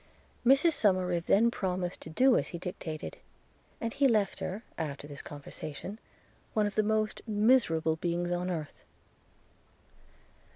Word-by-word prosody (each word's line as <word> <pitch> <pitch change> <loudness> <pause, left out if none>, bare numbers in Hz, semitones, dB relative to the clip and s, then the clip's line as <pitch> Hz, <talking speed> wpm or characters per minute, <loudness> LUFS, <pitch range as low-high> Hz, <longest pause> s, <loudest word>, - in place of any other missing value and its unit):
Mrs 275 +7 +5
Somerive 185 - +1
then 230 +4 +5
promised 180 -4 -2
to - - -8
do 255 +10 +4
as - - +1
he 170 - -5
dictated; 165 -3 -6 0.6
and 230 0 -3
he 275 - +4
left 215 -6 +1
her, 190 +3 -4
after 145 -3 -4
this 145 -1 -8
conversation, 150 +7 -7 0.6
one 215 -1 +3
of 205 - -2
the 215 - +3
most 215 0 0
miserable 205 -8 +3
beings 175 +1 -1
on 175 +1 -1
earth. 155 -5 -5
185 Hz, 135 wpm, -30 LUFS, 170-220 Hz, 0.6 s, Mrs